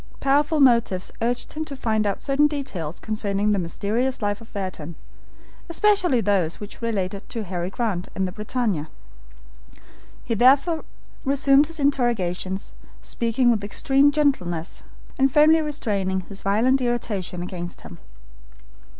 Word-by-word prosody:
Powerful 290 +3 +2
motives 235 -8 +3
urged 240 +2 -2
him 315 - -3
to 285 -3 -7
find 220 -5 0
out 200 - -3
certain 285 +1 +3
details 235 - -5
concerning 210 -1 -1
the 200 - +2
mysterious 215 +9 -1
life 205 0 -2
of 230 - -14
Ayrton, 170 -4 -5 0.7
especially 355 - +3
those 190 -5 +1
which 205 +2 -9
related 200 -3 -3
to 230 - -4
Harry 180 -2 -3
Grant 195 -5 -2
and 190 -1 0
the - - -6
BRITANNIA. 210 -6 -2 1.3
He 230 - -2
therefore 275 - +4 0.4
resumed 275 +1 +4
his 325 -1 -8
interrogations, 210 -9 0 0.3
speaking 235 +1 +1
with 215 -3 0
extreme 270 +7 +3
gentleness 190 - -1 0.4
and 270 0 +4
firmly 310 +3 +5
restraining 200 -11 -1
his 195 +2 -9
violent 235 +7 +2
irritation 210 -7 -2
against 175 -1 -6
him. - - -11
225 Hz, 135 wpm, -23 LUFS, 190-275 Hz, 1.3 s, firmly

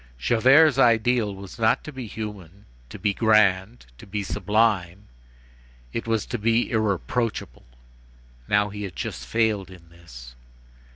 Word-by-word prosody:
Javert's 130 - +4
ideal, 115 -3 +2
was 100 +4 -11
not 110 0 +2
to 150 - -8
be 130 -4 -7
human, 100 -3 -8 0.2
to - - -9
be 105 -2 0
grand, 105 - +2
to - - -13
be 100 +1 -3
sublime; 105 -2 0 0.9
it 115 - -4
was 115 -2 0
to 120 - -5
be 115 +2 +1
irreproachable. 110 - -2 0.8
Now, 105 0 +2
he 105 +1 -8
had 95 -5 -6
just - - -6
failed 110 -4 0
in 85 -3 -15
this. 60 -8 -13
105 Hz, 135 wpm, -24 LUFS, 95-115 Hz, 0.9 s, Javert's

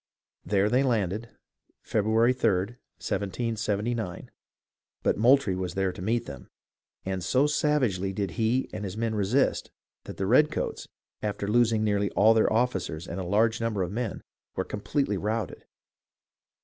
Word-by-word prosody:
There 100 0 +2
they 125 +5 +3
landed, 110 -3 0 0.5
February 110 +3 +2
3d, 100 -6 +1 0.3
1779; 110 -1 -2 0.7
but - - +2
Moultrie 120 -2 +4
was 90 -1 -4
there 95 -1 +1
to 90 - -9
meet 115 +5 0
them, 70 -4 -10 0.6
and 95 -1 -3
so 130 +9 +3
savagely 130 -11 +1
did 95 -2 -3
he 115 +8 0
and 105 -1 -5
his 100 +1 -5
men 115 -1 -1
resist 110 +6 +1 0.4
that - - -8
the 95 - -1
redcoats, 145 +9 +2 0.3
after 100 -1 -3
losing 110 0 +3
nearly 100 -1 +1
all 110 +3 +5
their 110 - +3
officers 95 -8 -1
and 85 - -5
a - - -3
large 110 +5 +2
number 110 -4 0
of 90 - -4
men, 115 0 -3 0.3
were 95 - -1
completely 105 +1 -1
routed. 110 -2 -3
105 Hz, 145 wpm, -27 LUFS, 95-115 Hz, 0.7 s, all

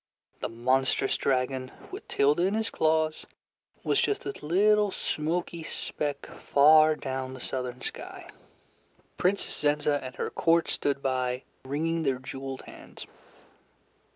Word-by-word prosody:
The - - -3
monstrous 130 +3 +1
dragon 130 -1 0 0.2
with 390 +4 -8
Tilda 145 +4 +2
in 190 +4 +2
his 220 +1 -1
claws 155 0 +1 0.6
was - - +2
just 415 - 0
a - - -1
little 205 +6 +4
smoky 170 0 -2
speck 145 -2 -4
far 155 +2 +5
down 130 -2 -4
the - - -9
southern 125 0 -4
sky. - - -7 0.9
Princess 195 +2 +1
Zenza 145 0 +1
and 130 -1 -7
her - - -3
court 165 0 +2
stood 140 -1 -1
by 130 -1 -1 0.2
wringing 160 +5 -1
their 135 -4 +1
jeweled 135 +1 -7
hands. - - -11
145 Hz, 125 wpm, -28 LUFS, 130-165 Hz, 0.9 s, far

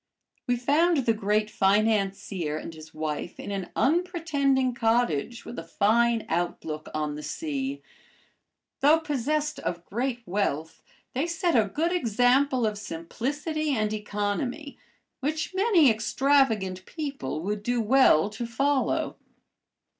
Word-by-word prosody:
We 245 - +2
found 285 +4 +2
the 230 - +4
great 210 0 +1
financier 195 -6 +1
and 165 - -7
his 155 0 -12
wife 155 +2 -4
in - - -6
an 195 -3 -4
unpretending 290 -6 +1
cottage 235 -3 0
with 240 - -6
a - - -6
fine 225 +6 +2
outlook 160 -3 -3
on 150 -1 -2
the 150 - -6
sea. 280 - -4 1.0
Though 300 +4 +5
possessed 300 0 -1
of 175 -1 -4
great 240 +3 -2
wealth 170 -5 -2 0.3
they 275 +6 0
set 340 0 0
a 215 -4 +3
good 325 - 0
example 250 - +2
of 210 -1 -2
simplicity 280 - -3
and 215 0 0
economy, 210 +7 -3 0.4
which 310 +6 -2
many 375 - +5
extravagant 220 -5 +1
people 280 - -4
would 205 +2 -2
do 245 +3 0
well 220 - +4
to 235 +2 -5
follow. 275 +4 0
235 Hz, 125 wpm, -27 LUFS, 200-285 Hz, 1.0 s, Though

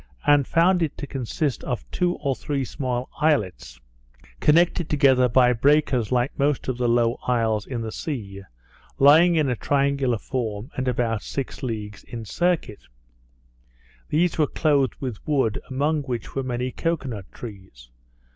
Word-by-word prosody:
and 145 -2 +4
found 175 +2 +3
it 160 -4 -1
to - - -5
consist 135 +1 -3
of 125 -3 -3
two 180 -1 0
or 135 -2 -2
three 140 -1 -3
small 125 -2 -3
islets, 90 - 0 0.6
connected 170 +1 +3
together 135 -4 +4
by 125 +1 +4
breakers 130 -3 +2
like 125 +2 +1
most 140 0 +1
of 130 - -1
the 120 -1 +1
low 120 0 +2
isles 115 -4 +1
in 120 -3 -4
the 110 - -4
sea, 105 - -5 0.6
lying 160 +5 +6
in 155 -3 +2
a 125 - 0
triangular 140 -1 +1
form, 115 +1 -4
and 130 0 -2
about 115 -3 0
six 135 +3 -5
leagues 105 -5 -5
in 115 -2 -7
circuit. 170 - -1 1.3
They 165 +4 +3
were 150 - +4
clothed 140 -4 +1
with 125 -6 -5
wood, 135 -8 +1
among 145 +4 0
which 125 -5 -5
were 135 - -1
many 125 0 -3
cocoa 165 -1 -2
nut 100 -6 -7
trees. 95 - -11
130 Hz, 155 wpm, -24 LUFS, 115-145 Hz, 1.3 s, lying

